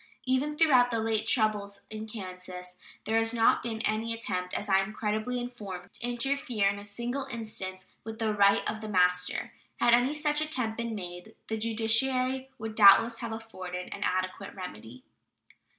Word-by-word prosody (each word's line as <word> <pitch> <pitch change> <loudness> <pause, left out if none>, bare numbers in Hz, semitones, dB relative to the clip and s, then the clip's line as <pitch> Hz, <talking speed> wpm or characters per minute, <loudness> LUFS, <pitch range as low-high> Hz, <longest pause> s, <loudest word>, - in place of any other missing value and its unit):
Even 270 +4 0
throughout 260 -7 +5
the 230 - -1
late 220 -1 0
troubles 210 -3 +1
in 215 0 -6
Kansas 180 -3 -8 0.3
there 225 +1 +2
has 225 +1 0
not 225 -1 +4
been 225 -2 -4
any 225 +1 -1
attempt, 180 -5 -3
as 205 - -2
I 195 -1 +4
am 195 +2 -2
credibly 215 +4 -1
informed, 200 -7 -7
to - - -11
interfere 245 -3 0
in 200 0 -3
a - - -9
single 240 +6 -3
instance 190 -5 -6 0.2
with 225 0 -7
the 220 -1 0
right 200 -1 +4
of 215 0 -3
the 215 - -6
master. 180 -2 +1 0.3
Had 240 - +5
any 250 +5 +4
such 295 0 +1
attempt 255 -8 -1
been 235 -1 -3
made, 180 +2 -7
the 220 - 0
judiciary 255 +4 +1
would 220 -1 -5
doubtless 220 +2 +7
have 235 -1 -4
afforded 185 -5 -6
an 200 - -8
adequate 185 -1 -2
remedy. 125 - -9
220 Hz, 170 wpm, -29 LUFS, 195-240 Hz, 0.3 s, doubtless